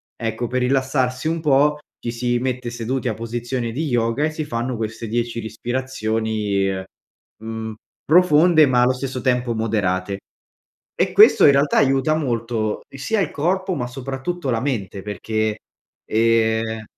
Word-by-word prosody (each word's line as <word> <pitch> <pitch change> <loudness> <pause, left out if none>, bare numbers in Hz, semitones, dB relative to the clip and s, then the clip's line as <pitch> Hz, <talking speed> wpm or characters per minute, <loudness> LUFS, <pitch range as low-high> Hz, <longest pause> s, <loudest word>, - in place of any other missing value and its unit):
ecco, 115 +1 -3
per 130 +2 -1
rilassarsi 130 +1 0
un 165 +1 -1
po' 150 0 +3 0.2
ci 120 - -2
si 120 +1 0
mette 125 -1 -2
seduti 125 +3 -3
a 115 - 0
posizione 120 +2 -3
di 150 +8 -2
yoga, 120 +2 +1
e 155 - -1
si 155 0 -4
fanno 120 -2 -3
queste 115 +1 -4
10 115 +1 -2
respirazioni, 110 -3 -2 0.7
mhmm, 110 0 -6 0.3
profonde, 160 -1 +5
ma 125 -3 +3
allo 125 +1 +4
stesso 130 0 -4
tempo 125 -2 +1
moderate. 100 -4 -1 0.8
E - - 0
questo, - - +7
in 140 - +7
realtà, 140 +1 +2
aiuta 135 +3 +3
molto, 115 -7 -1
sia 170 +11 -2
il 195 - 0
corpo, 185 +5 0
ma 125 -7 -3
soprattutto 135 +6 -5
la 115 -2 0
mente 105 -8 -3
perché, 110 +2 -2 0.5
ehm 110 0 +1
120 Hz, 145 wpm, -21 LUFS, 110-135 Hz, 0.8 s, questo